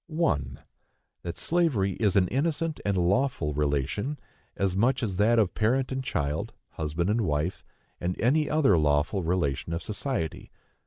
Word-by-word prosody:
1. 105 - -1 0.6
That 85 - -6
slavery 155 - +1
is 105 -3 +2
an 95 -2 +4
innocent 160 +3 -1
and 100 -2 0
lawful 90 - +1
relation, 75 - -1 0.4
as 95 -2 0
much 120 +6 +2
as 95 -5 -2
that 110 +4 +4
of 105 -5 +2
parent 125 +5 +1
and 130 0 -2
child, 75 - -2 0.2
husband 80 +5 -2
and 115 +2 +1
wife, 80 0 -1 0.4
or 85 - -1
any 145 +6 +2
other 140 - +4
lawful 75 +6 +1
relation 85 -3 -1
of 85 - -3
society. 105 - -3
100 Hz, 150 wpm, -27 LUFS, 80-130 Hz, 0.6 s, an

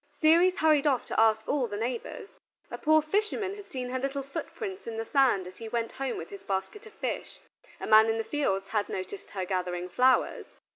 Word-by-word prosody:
Ceres 340 +4 +5
hurried 305 -2 +4
off 265 -4 +1
to - - -2
ask 220 -1 +3
all 275 -4 +1
the 205 -2 -5
neighbors. 240 - -4 0.4
A - - -5
poor 310 0 +4
fisherman 400 +3 -1
had 410 0 -10
seen 250 -1 -5
her 260 - -1
little 275 +1 -2
footprints 380 - -6
in 225 -1 -4
the 225 - -3
sand 260 -10 +3
as 185 +1 -11
he 225 -1 -7
went 230 0 -2
home 270 -2 -3
with - - -8
his 400 -1 -9
basket 195 - -4
of 435 - -15
fish. - - -5 0.4
A - - -5
man 220 +1 +6
in 225 - +1
the 225 - -1
fields 195 -9 -1
had 210 -1 -1
noticed 185 +1 -6
her 190 -2 -4
gathering 180 -1 -2
flowers. 255 +7 +2
250 Hz, 210 wpm, -28 LUFS, 215-310 Hz, 0.4 s, man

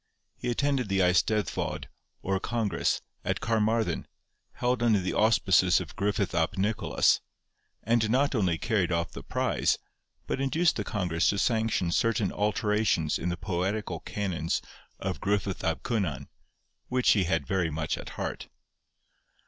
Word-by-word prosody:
He 125 - -4
attended 130 -2 0
the 95 - +1
Eisteddfod, 95 +3 +1 0.4
or 95 0 0
congress, 110 -5 -1 0.2
at - - -1
Carmarthen, 110 -4 0 0.5
held 125 0 0
under 115 -3 +4
the 95 0 -2
auspices 110 -3 +4
of - - -8
Griffith 100 -2 0
ap 85 +3 0
Nicholas, 105 +3 +2 0.6
and 115 -1 +2
not 135 +5 +2
only 95 -8 +1
carried 100 -3 0
off 85 0 0
the - - -8
prize, - - 0 0.5
but 135 - -2
induced 155 +5 +2
the - - -1
congress 90 -7 0
to 100 - 0
sanction 110 -4 +1
certain 115 0 +1
alterations 105 -5 +1
in 90 - -2
the 85 - -2
poetical 95 +4 -2
canons 85 -6 -2 0.4
of - - -3
Gruffudd 100 -2 -1
ab 80 - 0
Cynan, 95 - -1 0.6
which 125 0 +3
he 100 -4 +3
had 80 -4 0
very 90 -1 0
much 80 0 -2
at - - -8
heart. - - -4
100 Hz, 140 wpm, -28 LUFS, 90-115 Hz, 0.6 s, under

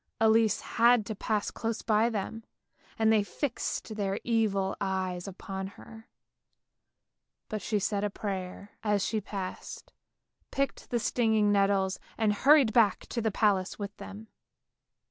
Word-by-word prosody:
Elise 220 0 +4
had 235 -1 +3
to 220 - -4
pass 210 +1 -1
close 225 0 -3
by 220 +1 +3
them, 225 +1 -4 0.5
and 220 0 +4
they 215 - +4
fixed 225 0 -3
their 200 -1 -1
evil 210 -5 +1
eyes 185 -2 -2
upon 190 0 -6
her, 225 0 -13 1.4
but 215 -2 -3
she 215 - 0
said 200 0 -1
a 210 - +1
prayer 195 -1 -5
as 205 -2 +1
she 220 -1 -1
passed, 195 -2 -7 0.6
picked 275 0 -2
the 240 - +1
stinging 220 -3 +2
nettles 195 -1 +2 0.2
and 220 -2 +2
hurried 270 0 +5
back 215 -5 +4
to 235 - -2
the 220 - +1
palace 200 -3 +1
with 200 -1 -6
them. 210 +2 -9
210 Hz, 140 wpm, -29 LUFS, 195-225 Hz, 1.4 s, hurried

